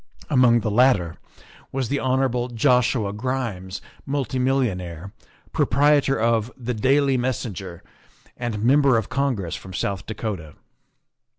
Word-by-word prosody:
Among 125 Hz, -4 st, +5 dB
the 110 Hz, -, -1 dB
latter 105 Hz, -8 st, +3 dB, 0.5 s
was 130 Hz, -3 st, -2 dB
the 140 Hz, -, 0 dB
Hon. 130 Hz, -2 st, 0 dB
Joshua 125 Hz, -3 st, +2 dB
Grimes, 105 Hz, -5 st, -4 dB, 0.2 s
multi 135 Hz, -2 st, -2 dB
millionaire, 100 Hz, -, -1 dB, 0.4 s
proprietor 140 Hz, +2 st, +3 dB
of 115 Hz, 0 st, +1 dB
the 125 Hz, -1 st, -3 dB
Daily 135 Hz, +4 st, +2 dB
Messenger, 105 Hz, -8 st, -4 dB, 0.5 s
and 115 Hz, -4 st, -4 dB
Member 135 Hz, 0 st, +4 dB
of 110 Hz, -, -2 dB
Congress 130 Hz, -10 st, -1 dB
from 95 Hz, -1 st, -9 dB
South 100 Hz, -1 st, -3 dB
Dakota. 100 Hz, -8 st, -5 dB
120 Hz, 115 wpm, -23 LUFS, 100-130 Hz, 0.5 s, Among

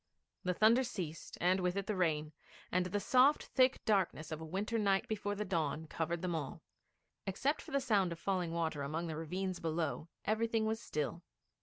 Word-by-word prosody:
The 180 Hz, 0 st, 0 dB
thunder 225 Hz, +6 st, +5 dB
ceased, 180 Hz, -10 st, -5 dB
and 185 Hz, +2 st, +3 dB
with 180 Hz, 0 st, 0 dB
it 200 Hz, -1 st, -1 dB
the 215 Hz, -, -1 dB
rain, 155 Hz, -4 st, +1 dB, 0.4 s
and 180 Hz, 0 st, +2 dB
the 205 Hz, +3 st, -1 dB
soft 260 Hz, +7 st, +5 dB
thick 255 Hz, 0 st, +2 dB
darkness 185 Hz, -7 st, +1 dB
of 155 Hz, 0 st, -4 dB
a -, -, -5 dB
winter 200 Hz, +7 st, -1 dB
night 195 Hz, -2 st, +2 dB
before 205 Hz, -1 st, -2 dB
the 210 Hz, +1 st, -2 dB
dawn 160 Hz, -4 st, -1 dB
covered 165 Hz, +2 st, -2 dB
them 180 Hz, -1 st, 0 dB
all. 150 Hz, -5 st, -4 dB, 0.6 s
Except 270 Hz, +10 st, 0 dB
for -, -, -11 dB
the 275 Hz, -, +2 dB
sound 205 Hz, -9 st, +2 dB
of 170 Hz, -, -4 dB
falling 180 Hz, -2 st, -1 dB
water 160 Hz, -3 st, -1 dB
among 155 Hz, +5 st, -2 dB
the 160 Hz, -2 st, -3 dB
ravines 180 Hz, +3 st, -3 dB
below, 160 Hz, -2 st, -2 dB, 0.2 s
everything 225 Hz, +1 st, +1 dB
was 220 Hz, 0 st, 0 dB
still. 155 Hz, -2 st, -3 dB
180 Hz, 190 wpm, -35 LUFS, 160-210 Hz, 0.6 s, thunder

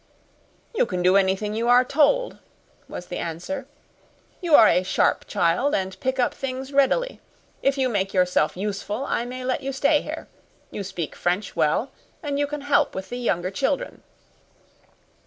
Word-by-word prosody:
"You 420 Hz, -, +2 dB
can 180 Hz, -3 st, -2 dB
do 185 Hz, +1 st, +5 dB
anything 195 Hz, +2 st, +2 dB
you 230 Hz, +2 st, -1 dB
are 250 Hz, +1 st, +6 dB
told," 315 Hz, -, +2 dB, 0.5 s
was 180 Hz, -, -7 dB
the 175 Hz, -, -5 dB
answer. 215 Hz, -, -5 dB, 0.7 s
"You 340 Hz, -4 st, +4 dB
are 220 Hz, -, +8 dB
a 180 Hz, -, +4 dB
sharp 185 Hz, -, +1 dB
child, 180 Hz, +13 st, +1 dB
and 190 Hz, -1 st, -3 dB
pick 260 Hz, 0 st, -1 dB
up 250 Hz, -, +1 dB
things 265 Hz, +1 st, -5 dB
readily. 280 Hz, -, +2 dB, 0.4 s
If 275 Hz, 0 st, +2 dB
you 265 Hz, -1 st, +2 dB
make 195 Hz, -5 st, -1 dB
yourself 180 Hz, -4 st, +2 dB
useful 205 Hz, +5 st, -3 dB
I 235 Hz, -, -1 dB
may 255 Hz, +1 st, -6 dB
let 255 Hz, +2 st, -1 dB
you 275 Hz, 0 st, -3 dB
stay 285 Hz, +2 st, +2 dB
here. -, -, -7 dB, 0.4 s
You 205 Hz, -, -4 dB
speak 180 Hz, -4 st, -5 dB
French 180 Hz, +4 st, -1 dB
well, 155 Hz, -, +1 dB, 0.3 s
and 285 Hz, -1 st, -2 dB
you 290 Hz, -, +1 dB
can 295 Hz, 0 st, -5 dB
help 285 Hz, 0 st, +2 dB
with 190 Hz, 0 st, -5 dB
the 245 Hz, -, -5 dB
younger 185 Hz, -6 st, -1 dB
children." 390 Hz, -, -2 dB
245 Hz, 170 wpm, -24 LUFS, 190-275 Hz, 0.7 s, are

